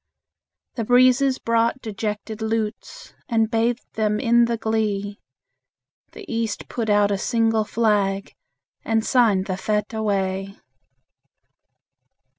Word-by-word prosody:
The 230 - -1
breezes 255 +3 +4
brought 230 +2 +1
dejected 215 -1 -5
lutes, 225 - -4 0.2
And 225 -2 +1
bathed 230 +1 0
them 215 -1 0
in 235 +1 +4
the 235 0 -1
glee; 210 -2 -2 0.9
The 425 - -10
East 225 -6 -3
put 230 -3 -3
out 205 0 +3
a 200 - -1
single 225 -1 +1
flag, 205 -3 0 0.5
And 225 0 0
signed 220 -7 +3
the 185 -2 -3
fete 210 +2 -2
away. 195 -2 -2
220 Hz, 110 wpm, -22 LUFS, 205-230 Hz, 0.9 s, breezes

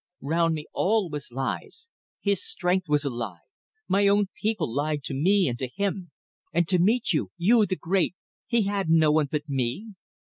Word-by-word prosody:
Round 165 +3 +1
me 150 -1 -6
all 200 -3 +1
was 150 -4 -6
lies. 135 - -4 0.3
His 200 -3 0
strength 180 -1 -1
was 150 0 +2
a - - +1
lie. 110 -9 -5 0.5
My 200 +1 +3
own 200 -1 +3
people 210 - -1
lied 145 +1 -1
to 135 - -4
me 185 +7 +3
and 120 -2 -3
to 130 - -2
him. 190 +4 -3 0.4
And 170 -1 +1
to 180 -2 +3
meet 220 +4 +2
you 110 - 0
you, 215 +4 +4
the 185 - -1
great! 180 0 0 0.3
he 235 -2 +2
had 200 -3 -1
no 160 -2 +5
one 155 -1 +2
but 150 0 -2
me? 135 - -2
170 Hz, 185 wpm, -26 LUFS, 150-200 Hz, 0.5 s, no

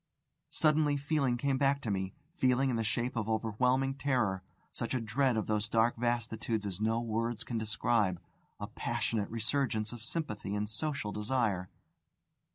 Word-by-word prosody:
Suddenly 150 -2 +3
feeling 140 -3 +1
came 135 +1 +1
back 140 0 +3
to 110 - -1
me 95 -1 -2 0.2
feeling 130 -4 +3
in - - 0
the 115 - 0
shape 120 +3 -1
of 110 -1 -1
overwhelming 125 +5 +2
terror; 125 -9 +1 0.3
such - - -3
a - - +2
dread 120 +2 +1
of 110 - 0
those 105 -1 0
dark 115 +1 +3
vastitudes 115 -2 -1
as 100 0 -4
no 110 +1 +2
words 115 0 -1
can 115 -2 -2
describe, 110 -4 +1 0.4
a - - -3
passionate 105 -3 -1
resurgence 115 -1 0
of 120 -2 -9
sympathy 110 - -3
and 105 +1 -1
social 140 -3 -2
desire. 105 -4 0
115 Hz, 160 wpm, -32 LUFS, 110-130 Hz, 0.4 s, Suddenly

